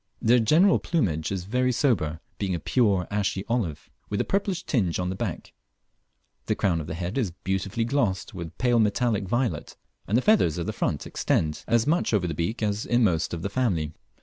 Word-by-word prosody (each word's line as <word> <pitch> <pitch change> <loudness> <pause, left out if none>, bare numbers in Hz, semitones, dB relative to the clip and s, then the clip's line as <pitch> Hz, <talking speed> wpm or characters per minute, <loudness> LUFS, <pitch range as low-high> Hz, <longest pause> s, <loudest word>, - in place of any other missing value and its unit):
The 120 +2 +4
general 165 - +4
plumage 90 - -1
is 95 -2 -2
very 125 +6 +1
sober, 95 - 0 0.2
being 95 -3 -1
a - - -3
pure 100 - +2
ashy 100 -1 -1
olive, 115 -11 -2 0.2
with 100 - -1
a - - +2
purplish 195 -2 -1
tinge 95 - 0
on 90 0 -1
the - - -4
back; - - -5 0.9
the - - +1
crown 85 -4 +1
of 75 - -8
the 80 - -4
head 90 +8 -3
is 110 -7 0
beautifully 95 +4 -1
glossed 115 -7 0
with 85 -3 -7
pale 120 -2 +3
metallic 105 -1 +1
violet, 120 +4 -1 0.3
and 105 - +2
the 130 - +1
feathers 200 - +3
of 85 - -2
the - - -3
front - - -2
extend 75 -1 -1
as 115 -1 +3
much 155 -6 +2
over 95 -4 +1
the 85 - -2
beak 85 +10 -2
as 105 0 0
inmost 105 -10 +2
of 85 -1 -5
the - - 0
family. 90 -12 0
100 Hz, 200 wpm, -26 LUFS, 90-120 Hz, 0.9 s, The